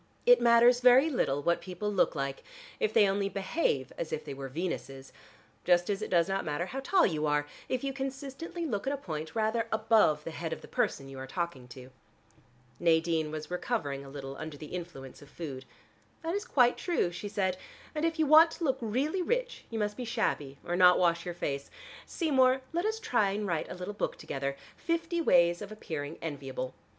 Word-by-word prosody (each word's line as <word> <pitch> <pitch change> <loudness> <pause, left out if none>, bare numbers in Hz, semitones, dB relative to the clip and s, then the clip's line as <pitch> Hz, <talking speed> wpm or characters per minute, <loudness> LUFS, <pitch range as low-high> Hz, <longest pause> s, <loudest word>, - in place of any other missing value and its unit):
"It - - +7
matters 240 +1 +6
very 255 +5 +6
little 145 - 0
what 170 +2 +2
people 195 +3 -4
look 185 - +2
like, 135 -1 -3 0.4
if 445 -3 +1
they 205 - +5
only 195 0 0
behave 195 - -1
as 160 - -3
if 155 - -3
they 145 - -5
were 135 0 -6
Venuses, 135 -4 -5 0.5
just 175 +2 +3
as 200 +1 -2
it 215 - -4
does 170 -1 +3
not 195 0 -1
matter 155 +3 -2
how 265 +8 -5
tall 365 +7 +3
you 155 -3 0
are 150 0 +1 0.2
if 255 0 -1
you 275 0 -2
consistently 270 +5 -5
look 220 -4 -3
at 275 - +1
a - - -2
point 160 - -6
rather 225 +1 +1
above 220 -9 +3
the 165 - -5
head 160 0 -4
of - - -7
the - - -12
person 135 - -1
you 135 -1 -9
are 135 - -6
talking 135 -4 -4
to." 130 +1 -12 0.9
Nadine 165 -2 +2
was 155 +2 -6
recovering 165 - -2
a 135 - -11
little 135 -1 -7
under 155 -1 -7
the 150 +2 -10
influence 165 -8 -7
of 145 - -14
food. 140 -5 -7 0.6
"That 330 +1 -2
is 410 +3 -2
quite 245 - +4
true," 340 - 0
she 190 +4 -6
said. 190 -2 0 0.4
"And 305 0 -3
if 330 0 +1
you 315 - +3
want 315 +3 +8
to - - -7
look 265 -4 +1
really 270 - 0
rich, - - -2
you 230 - -4
must 210 -1 -1
be 255 - -4
shabby, 145 - -1
or 175 - -1
not 180 0 +7
wash 170 -1 +2
your 175 - -4
face. 140 -5 -3 0.4
Seymour, 265 -5 +3
let 345 +3 0
us 440 +1 -1
try 235 - +2
and 210 +1 -2
write 170 -5 -2
a - - -6
little 180 +3 -5
book 205 - -3
together, 140 0 -4 0.2
'Fifty 335 0 -1
ways 175 - +4
of 205 0 -7
appearing 155 -7 -5
enviable.' 135 -4 -4
185 Hz, 205 wpm, -30 LUFS, -, 0.9 s, want